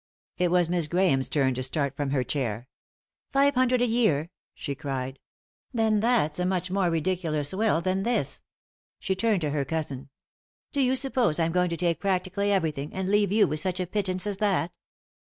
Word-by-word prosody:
It 180 -1 +2
was 175 -1 +3
Miss 170 -2 0
Grahame's 170 -6 +2
turn 135 -3 +2
to 130 - -4
start 140 +1 0
from 145 -1 -2
her 135 -2 +1
chair. 120 -3 -3 0.3
" - - -70
Five 280 +1 +4
hundred 255 -1 +2
a - - +4
year 225 -10 +2
I 160 - -11 0.2
" - - -68
she 140 - -4
cried. 135 -2 -5 0.3
" - - -50
Then 220 -2 +2
that's 215 -9 +1
a 180 - 0
much 185 -1 -1
more 190 -2 +1
ridiculous 165 -3 -1
will 210 -4 +1
than 185 +2 0
this 240 +4 -1
I - - -54 0.2
" - - -76
She 190 - +1
turned 205 -1 +1
to 150 -2 -1
her 145 -1 0
cousin. 140 -2 -4 0.6
"Do 285 - +1
you 260 0 +2
suppose 255 - +2
I'm 165 0 +1
going 180 +1 +1
to 170 - -3
take 170 -1 0
prac 190 -2 0
tically 200 +2 -2
everything, 155 -7 -1
and 190 0 -2
leave 205 -2 +3
you 210 0 +4
with 155 +1 -1
such 185 +3 -1
a 185 - 0
pittance 185 0 -1
as 205 -2 -2
that?" 195 -4 0
180 Hz, 215 wpm, -26 LUFS, 150-205 Hz, 0.6 s, Five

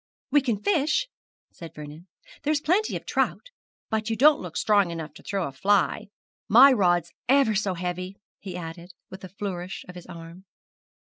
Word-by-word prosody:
'We 290 - +5
can 230 -6 -2
fish,' 325 - +1 0.4
said 165 -2 -11
Vernon; 150 +4 -10 0.3
'there's 300 0 +1
plenty 370 +8 +1
of - - -6
trout; - - -1 0.4
but 220 0 -1
you 225 - 0
don't 295 +5 +5
look 175 -3 -7
strong 205 -4 +3
enough 165 -3 -6
to - - -14
throw 195 -3 -2
a - - -7
fly. 195 +8 +1 0.4
My 255 +6 +8
rod's 175 -7 +2 0.2
ever 270 -4 +4
so 195 -2 -1
heavy,' 180 +2 -4 0.2
he 185 -3 -7
added, 170 +1 -9 0.2
with 190 0 -10
a 185 - -8
flourish 190 -2 -6
of 180 - -10
his 180 -1 -11
arm. 170 +1 -11
190 Hz, 175 wpm, -25 LUFS, 175-235 Hz, 0.4 s, My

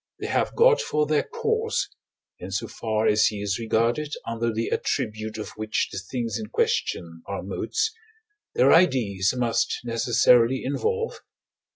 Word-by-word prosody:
they - - -5
have - - 0
God 475 0 +5
for 150 0 0
their 150 0 +2
cause, 455 -1 -1 0.5
in - - -7
so - - -2
far 110 -1 -2
as 105 +1 +4
he 105 - -3
is 100 0 -2
regarded 115 +6 0
under 115 0 -1
the 115 +1 -2
attribute 110 -4 -2
of 110 - -5
which 110 0 -2
the 100 - -4
things 115 +4 -3
in 215 - -5
question 95 - -1
are 100 - -4
modes, 105 - -1 0.6
their 135 +2 +5
ideas 115 - +3
must 120 -2 0
necessarily 120 +1 +3
involve 460 - -1
(I. - - -34
115 Hz, 155 wpm, -25 LUFS, 110-150 Hz, 0.6 s, God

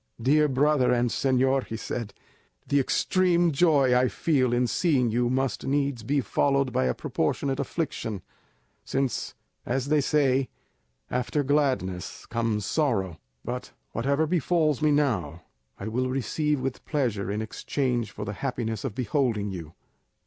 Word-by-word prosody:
"Dear 150 +5 +4
brother 140 -1 +3
and 120 -1 +2
señor," 130 +1 +2
he 110 - -5
said, 115 0 -4 0.6
"the 140 - +3
extreme 175 +4 +2
joy 140 -4 +4
I 125 +1 +4
feel 130 -4 +1
in 120 +1 +2
seeing 125 -3 +2
you 120 +1 +1
must 130 +1 -1
needs 140 -3 0
be 140 +6 0
followed 140 0 +1
by 65 - +2
a 65 - 0
proportionate 135 -1 -1
affliction, 115 - -3 0.6
since, 135 -3 -2 0.3
as 130 +2 -2
they 150 -1 +4
say, 135 -3 +2 0.6
after 125 +4 0
gladness 130 - -1
comes 115 -3 -1
sorrow; 100 - 0 0.3
but 125 +1 -5 0.2
whatever 140 +6 +1
befals 160 -2 +1
me 155 - +4
now 105 - 0 0.3
I 100 - -6
will 125 +3 -1
receive 145 +3 0
with 130 -1 -4
pleasure 115 - -1
in 105 - -2
exchange 120 +1 -2
for 105 0 -7
the 105 - -4
happiness 115 -5 -2
of 120 -6 -4
beholding 115 -5 0
you." 85 -3 -8
130 Hz, 140 wpm, -26 LUFS, 115-145 Hz, 0.6 s, Dear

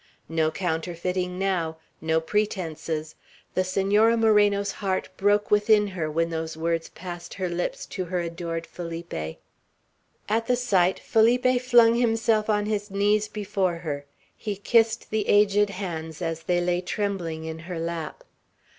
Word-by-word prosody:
No 160 -1 +1
counterfeiting 180 +2 -2
now. 180 -4 -1 0.2
No 160 0 +2
pretences. 160 -5 -2 0.4
The 185 - +2
Senora 205 +5 +3
Moreno's 205 -2 +3
heart 190 -2 -2
broke 205 +2 +2
within 210 0 +5
her, 170 -5 -3
when 165 +2 0
those 160 -1 -4
words 165 0 -1
passed 175 -1 -8
her 185 -2 -2
lips 175 0 -3
to 185 -2 -4
her 180 +1 -2
adored 170 -1 -4
Felipe. 170 0 -7 1.1
At 225 +2 0
the 250 - +3
sight, 190 -7 +2
Felipe 245 +3 +3
flung 240 -2 +6
himself 225 -2 +2
on 210 -1 +2
his 210 -1 -2
knees 205 +2 +2
before 195 -4 -1
her; 150 -4 -5 0.3
he 210 -2 -4
kissed 225 +3 +2
the 215 -1 0
aged 205 0 +4
hands 165 -5 -5
as 165 -2 -3
they 175 +1 +1
lay 175 0 +1
trembling 180 -4 -3
in 160 0 -5
her 170 +1 -6
lap. 165 -1 -4
185 Hz, 145 wpm, -25 LUFS, 165-210 Hz, 1.1 s, flung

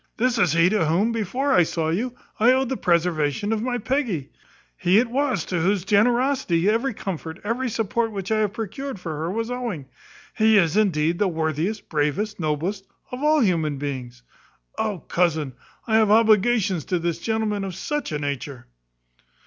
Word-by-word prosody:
This 245 0 +1
is 175 -7 +3
he 165 +1 +5
to 200 -6 +1
whom, 190 +9 +2
before 250 +6 -1
I 180 - +6
saw 160 -1 -1
you, 235 +9 -2 0.2
I 235 +3 +6
owed 260 -1 +1
the 265 - -1
preservation 170 - +1
of 215 - -1
my 245 +1 -1
Peggy. 235 - -2 0.4
He 180 - +3
it 235 +1 +2
was 275 0 0
to 180 - -2
whose 190 +1 +1
generosity 225 -3 +2
every 230 +3 +1
comfort, 165 -5 -5
every 240 +4 -1
support 225 +1 -1
which 195 -1 -5
I 220 - +3
have 210 -2 0
procured 230 +3 -5
for 165 -3 -5
her, 160 +3 -3
was 225 +5 -3
owing. 235 - -4 0.5
He 220 -1 +4
is, 170 -4 +3
indeed, 170 -6 +2
the 205 - +3
worthiest, 160 +5 -2
bravest, 165 +8 -1
noblest; 175 +6 -2 0.2
of 250 +1 -6
all 305 0 +3
human 160 - +1
beings. 130 -3 -6 0.6
O 210 -3 -1
cousin, 160 -6 0 0.3
I 220 -2 +3
have 220 -2 +4
obligations 215 -4 +3
to 180 - 0
this 170 -1 -2
gentleman 220 -2 -1
of 190 -2 -5
such 295 - -3
a 150 - -1
nature!" 140 -3 -5
200 Hz, 175 wpm, -23 LUFS, 165-230 Hz, 0.6 s, I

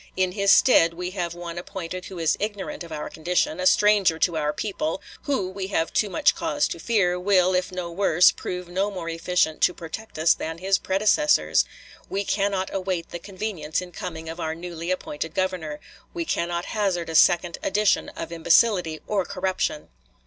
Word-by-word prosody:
In 185 -1 +2
his 200 +1 +2
stead 165 -10 +5
we 180 +1 -4
have 175 -3 -3
one 175 -1 -6
appointed 185 0 -6
who 185 - -9
is 165 -2 +2
ignorant 205 -3 -4
of 170 - -11
our 150 -1 -4
condition, 170 0 -1
a 185 - +2
stranger 205 -6 +4
to 170 0 +1
our 150 -1 0
people; 215 - -3 0.3
who, 270 -10 0
we 190 0 -5
have 165 -4 -1
too 210 - +1
much 290 +9 +3
cause - - 0
to - - -5
fear, 180 -6 +1
will, 185 -1 +3
if 180 +1 0
no 180 -2 -5
worse, 180 -1 +5
prove 180 -1 -6
no 190 +4 -1
more 180 -4 -5
efficient 165 -1 0
to 180 - +3
protect 175 +5 -8
us 160 +2 +5
than 160 +1 -5
his 190 +2 +1
predecessors.... 215 +11 +3 0.4
We 200 +1 -1
cannot 195 -2 -1
await 185 -3 -2
the 175 - -5
convenience 185 -5 -4
in 180 -1 -7
coming 165 -2 -7
of 165 +2 -6
our 160 -1 -2
newly 170 0 -6
appointed 160 -3 -3
Governor. 180 -5 -2 0.4
We 340 -1 -2
cannot 175 - -1
hazard 190 -5 0
a 165 - -5
second 175 +1 +4
edition 210 +1 +1
of 165 - -7
imbecility 170 0 +3
or 200 -3 0
corruption!" 185 -5 -2
180 Hz, 185 wpm, -24 LUFS, 165-195 Hz, 0.4 s, stead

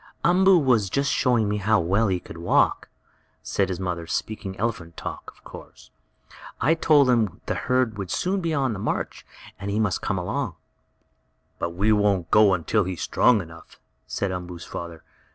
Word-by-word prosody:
"Umboo 190 +2 +5
was 125 - +2
just 140 +4 0
showing 120 -4 +2
me 105 +1 -1
how 105 +2 +2
well 95 +7 +1
he 95 -2 0
could 85 - -11
walk," 85 - +1 0.5
said 95 -2 0
his 90 -1 -3
mother, 90 -3 -3
speaking 95 +1 -4
elephant 95 -7 -3
talk, - - -6
of - - -27
course. - - -13 0.7
"I 150 +7 +3
told 150 -4 +4
him 110 -7 +1
the - - -1
herd 125 -4 0
would 95 -2 -5
soon 190 - -1
be 165 -2 -1
on 135 -6 0
the 100 - -6
march, - - -3 0.3
and 100 +1 -5
that - - -2
he 105 - 0
must 105 -5 0
come - - -1
along." - - -3 1.0
"But 85 0 -3
we 105 +4 +2
won't 100 -5 +1
go 105 -2 +6
until 100 +5 0
he 95 - -3
is 85 - -8
strong 115 -5 +3
enough," 85 -1 -14 0.3
said 100 -2 -2
Umboo's 90 -1 -6
father. 85 -2 -8
105 Hz, 185 wpm, -24 LUFS, 90-125 Hz, 1.0 s, go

